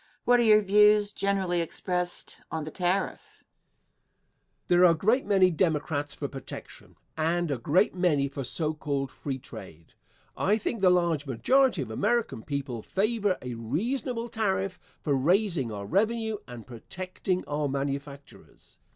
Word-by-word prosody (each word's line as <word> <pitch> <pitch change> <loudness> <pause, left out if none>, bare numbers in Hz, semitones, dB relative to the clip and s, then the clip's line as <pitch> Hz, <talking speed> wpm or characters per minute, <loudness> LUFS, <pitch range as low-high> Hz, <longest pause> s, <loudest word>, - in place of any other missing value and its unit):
Question. - - -32
What 245 0 +5
are - - +4
your 215 -1 +6
views, 210 +1 +5
generally 190 -3 0
expressed, 180 +1 -3
on 160 -1 -3
the 155 - -7
tariff? 180 +3 -1
Answer. - - -30 1.2
There 175 0 +5
are 180 - +8
a - - -5
great 220 - +2
many 190 -3 +4
Democrats 150 -3 0
for 140 - -4
protection 135 -1 -10 0.2
and 165 +1 0
a 135 - -2
great 175 - +2
many 170 -7 +2
for 140 0 -5
so 155 +4 -1
called 140 -3 -3
free 135 -2 -5
trade. 95 - -12 0.4
I 210 +3 +2
think 220 0 -3
the 185 - +6
large 170 -5 +1
majority 240 - +2
of 110 - -9
American 210 - 0
people 135 -3 -4
favor 205 - 0
a 125 -1 -4
reasonable 230 - -2
tariff 195 -4 -1 0.2
for 145 - 0
raising 165 - +1
our 100 -1 -5
revenue 220 - 0
and 120 -3 -9
protecting 180 - -4
our 145 0 -1
manufactures. 140 +1 -6
175 Hz, 150 wpm, -27 LUFS, 140-200 Hz, 1.2 s, are